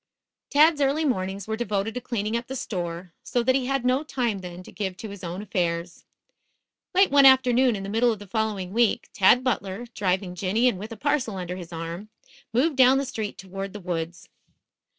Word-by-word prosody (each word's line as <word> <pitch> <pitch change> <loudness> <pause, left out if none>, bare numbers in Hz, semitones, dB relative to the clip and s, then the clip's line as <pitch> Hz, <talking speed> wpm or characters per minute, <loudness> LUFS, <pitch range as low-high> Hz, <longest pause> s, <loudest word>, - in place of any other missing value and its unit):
Tad's 300 +1 +5
early 285 +3 +2
mornings 195 -6 -2
were 220 - -1
devoted 215 -1 -2
to 250 - -4
cleaning 220 -3 -2
up 235 0 -3
the 265 - -5
store, 175 -6 -5
so 245 - -1
that 260 +2 +3
he 255 -1 0
had 270 -2 -1
no 255 +2 +3
time 245 -9 -2
then 180 0 -8
to - - -13
give 190 -3 -4
to 220 - -7
his 200 -2 -10
own 180 +3 -5
affairs. 170 -3 -2 0.9
Late 385 +1 +5
one 280 -1 +8
afternoon 255 -2 +5
in 195 - -5
the - - -5
middle 230 +3 +3
of 220 - -3
the 205 - -11
following 205 -3 -2
week, 235 -1 +2
Tad 220 +6 +5
Butler, 215 -3 -2
driving 185 -2 -1
Jinny 200 +7 +1
and 200 -7 +1
with 215 +4 -7
a 225 - -7
parcel 280 -5 0
under 180 -1 -4
his 180 -2 -9
arm, 170 +5 -6 0.4
moved 275 +6 +1
down 260 0 +6
the 275 - 0
street 220 -5 -5
toward 195 +1 -6
the 210 - -7
woods. 175 -2 -4
215 Hz, 205 wpm, -25 LUFS, 185-250 Hz, 0.9 s, one